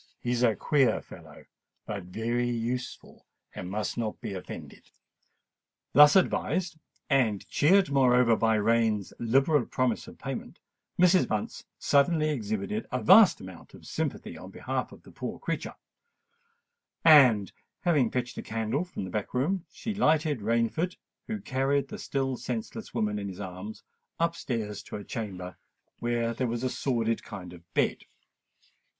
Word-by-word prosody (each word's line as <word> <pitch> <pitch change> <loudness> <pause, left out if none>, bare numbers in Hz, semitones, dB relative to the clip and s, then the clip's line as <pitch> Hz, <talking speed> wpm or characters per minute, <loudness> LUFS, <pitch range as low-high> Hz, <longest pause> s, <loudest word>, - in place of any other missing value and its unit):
He 120 - -2
is 120 -1 0
a 115 -3 +4
queer 135 -4 +2
fellow, - - -14 0.4
but 100 -4 -5
very 115 +6 -1
useful—and 120 -5 -6
must 105 +3 -3
not 110 -2 -3
be - - -5
offended." 95 - -9 1.0
Thus 150 +1 +8
advised, 180 -2 +1 0.3
and 120 -8 +1
cheered 185 +1 +4
moreover 125 -3 +4
by 110 0 +2
Rain's 110 -2 +1
liberal 135 +5 +3
promise 130 -3 -1
of - - -12
payment, - - -6 0.4
Mrs. 180 +1 +5
Bunce 105 -1 -3
suddenly 155 +2 +3
exhibited 110 - -3
a - - 0
vast 200 +2 +7
amount - - -11
of - - -15
sympathy - - -4
on - - -10
behalf - - -3
of - - -14
the - - -15
poor - - -6
creature; - - -4 1.3
and, 130 -11 +7 0.3
having 150 -9 +3
fetched 125 0 -3
a - - -3
candle 115 +7 -2
from 180 - -6
the 95 - -6
back 105 +3 -4
room, 170 +8 0
she 220 - -5
lighted 155 - +2
Rainford, 115 - 0 0.3
who 220 -1 -3
carried 135 -4 0
the - - -7
still 135 -2 -2
senseless 220 - -5
woman 105 -3 -1
in 100 - -4
his 95 - -9
arms, 95 +2 -7 0.4
up 170 0 +1
stairs 110 -8 -4
to - - -9
a 105 - -6
chamber 95 -6 -6 0.4
where 120 -1 0
there 125 +2 -1
was 120 +1 -3
a 130 - 0
sordid 115 -4 0
kind 90 -4 -9
of 85 -1 -16
bed. - - +1
120 Hz, 150 wpm, -28 LUFS, 110-150 Hz, 1.3 s, Thus